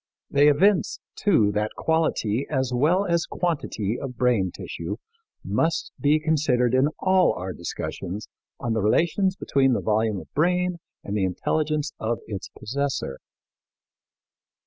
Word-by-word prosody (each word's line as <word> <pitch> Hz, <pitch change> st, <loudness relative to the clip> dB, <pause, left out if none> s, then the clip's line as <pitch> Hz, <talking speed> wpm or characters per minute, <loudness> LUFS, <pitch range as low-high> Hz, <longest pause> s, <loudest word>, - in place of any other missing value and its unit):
They 140 Hz, +1 st, +5 dB
evince, 180 Hz, +7 st, +3 dB, 0.2 s
too, 135 Hz, -, +3 dB
that 105 Hz, +1 st, -2 dB
quality 140 Hz, -7 st, 0 dB
as 130 Hz, -3 st, 0 dB
well 165 Hz, +10 st, +3 dB
as 170 Hz, -2 st, +1 dB
quantity 125 Hz, -, -2 dB
of 130 Hz, -3 st, -6 dB
brain 120 Hz, -7 st, +2 dB
tissue -, -, -5 dB, 0.5 s
must 165 Hz, 0 st, 0 dB
be 150 Hz, +1 st, +3 dB
considered 145 Hz, -6 st, +2 dB
in 130 Hz, +2 st, +4 dB
all 185 Hz, -1 st, +3 dB
our 90 Hz, 0 st, -5 dB
discussions 90 Hz, +3 st, -5 dB, 0.3 s
on 115 Hz, -, -1 dB
the 110 Hz, -, 0 dB
relations 170 Hz, -, +2 dB
between 135 Hz, -7 st, +2 dB
the -, -, +1 dB
volume 110 Hz, -2 st, +1 dB
of 80 Hz, -, -14 dB
brain 180 Hz, +3 st, +1 dB, 0.2 s
and 100 Hz, -, -4 dB
the 105 Hz, -, +1 dB
intelligence 150 Hz, -, -1 dB
of 115 Hz, +1 st, -1 dB
its 100 Hz, -3 st, -6 dB
possessor. 130 Hz, -, -3 dB
135 Hz, 135 wpm, -25 LUFS, 110-160 Hz, 0.5 s, They